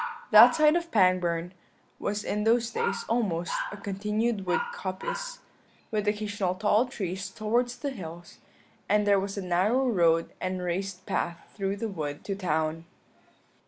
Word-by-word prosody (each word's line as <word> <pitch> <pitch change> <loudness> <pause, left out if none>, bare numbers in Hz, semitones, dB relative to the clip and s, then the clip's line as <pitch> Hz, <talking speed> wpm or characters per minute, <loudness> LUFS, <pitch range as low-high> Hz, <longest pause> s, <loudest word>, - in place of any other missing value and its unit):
That - - +9
side 305 0 +5
of 340 -1 -1
Pangbourne 180 - +2 0.5
was 205 +1 -2
in 210 0 -1
those 230 +1 +2
days - - -1
almost 195 -8 0 0.2
a 210 - -7
continued 210 +1 -2
wood 180 - +2
coppice, - - -5 0.5
with 210 -1 -1
occasional 205 -3 -1
tall 210 +5 +2
trees 195 -5 -4
towards 240 +4 -1
the 280 +3 -3
hills, 175 -6 -9 0.5
and 210 +1 +3
there 200 -1 +4
was 195 +1 -4
a 200 - -3
narrow 200 +9 +2
road 165 -7 +3
and 185 0 -2
raised 185 +1 -3
path 170 -1 -3
through 195 -1 -1
the 225 +3 -3
wood 150 -7 -5
to 200 - -3
the 200 - -8
town. 160 -1 -1
200 Hz, 155 wpm, -28 LUFS, 180-225 Hz, 0.5 s, That